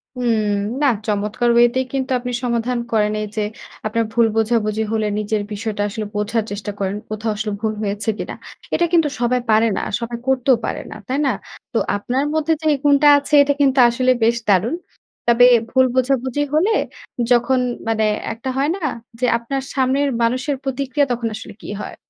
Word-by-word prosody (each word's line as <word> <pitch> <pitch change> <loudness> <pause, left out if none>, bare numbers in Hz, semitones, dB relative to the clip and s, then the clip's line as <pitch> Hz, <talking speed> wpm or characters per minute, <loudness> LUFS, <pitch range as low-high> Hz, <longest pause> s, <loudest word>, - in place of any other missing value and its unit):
হুম। 235 -3 +1 0.4
না 290 - +4 0.2
চমৎকার 210 +3 0
ওয়েতেই 240 +2 +4
কিন্তু 265 -1 -2
আপনি 245 0 -5
সমাধান 240 0 0
করেন। 210 -2 +2
এইযে 215 +1 -4 0.4
আপনার 230 +1 0
ভুল 235 -1 +4
বোঝাবুঝি 220 -1 +1
হলে 220 -1 0
নিজের 215 0 -1
বিষয়টা 210 0 -3
আসলে 215 +1 -4
বোঝার 210 +2 0
চেষ্টা 205 0 -4
করেন। 195 0 -1
কোথাও 215 +1 -2
আসলে 215 0 -3
ভুল 220 -1 0
হয়েছে 205 +1 -2
কিনা। - - -5 0.4
এ - - +4
এটা 345 - +3
কিন্তু 325 -3 +4
সবাই 245 +1 +1
পারে 220 +1 +4
না - - -1 0.2
সবাই 235 0 -4
করতেও 260 -1 +3
পারে - - -3
না, - - -7
তাই 270 +2 -1
না? 270 - +3 0.4
তো 230 - +1 0.2
আপনার 250 +6 -1
মধ্যে 315 +1 +1
যেই 305 -1 +3
গুণটা 290 0 +5
আছে 285 +1 -5
এটা 285 0 +1
কিন্তু 270 -1 +3
আসলে 255 +2 +2
বেশ 230 +1 +4
দারুণ। 205 - +3 0.5
তবে 235 +1 +6 0.2
ভুল 260 0 +4
বোঝাবুঝি 260 +1 +1
হলে 345 +8 +3 0.6
যখন 245 +2 +3 0.3
মানে 220 -1 +1 0.3
একটা 235 +4 -6
হয় 280 +3 +1
না - - -7 0.4
যে 255 - +1
আপনার 270 +4 -3
সামনের 270 +2 +1
মানুষের 255 +4 0
প্রতিক্রিয়া 275 +1 0
তখন 235 -1 -1
আসলে 220 -1 -9
কী - - -9
হয়? - - -7
240 Hz, 175 wpm, -20 LUFS, 220-265 Hz, 0.6 s, তবে